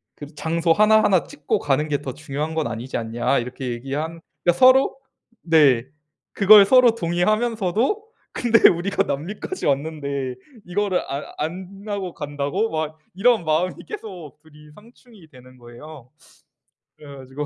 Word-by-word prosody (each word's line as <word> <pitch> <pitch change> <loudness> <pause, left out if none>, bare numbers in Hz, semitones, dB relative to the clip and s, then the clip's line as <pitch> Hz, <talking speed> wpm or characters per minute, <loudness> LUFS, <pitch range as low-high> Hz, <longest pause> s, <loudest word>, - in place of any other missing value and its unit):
그 145 +1 -11
장소 165 +2 +1
하나하나 210 -3 +4
찍고 150 - -3
가는 145 +2 0
게 145 -1 -1
더 130 -3 -6
중요한 155 +2 -5
건 160 -5 -1
아니지 115 +4 -5
않냐." 115 +4 -1
이렇게 125 +1 -6
얘기한 140 +7 -5 0.2
그러니까 175 0 +2
서로 260 +1 +5 0.5
네. 145 -8 +4 0.5
그걸 205 0 +7
서로 250 +1 +5
동의하면서도 215 - 0 0.3
"근데 235 -2 +5
우리가 190 +3 +1
남미까지 190 - -5
왔는데 140 -2 -2 0.3
이거를 190 +1 -1
안 140 +2 -4
안 185 +5 -6
하고 195 -4 -4
간다고?" 145 +8 -3
막 155 0 -4 0.2
이런 215 0 +2
마음이 160 +4 0
계속 185 - -9
2 160 0 -21
이 150 0 -16
상충이 225 -4 -19
되는 130 -2 -17
거예요. 125 +3 -13 0.9
그래 145 -2 -12
가지고 135 +2 -7
160 Hz, 305 characters per minute, -22 LUFS, 140-200 Hz, 0.9 s, 그걸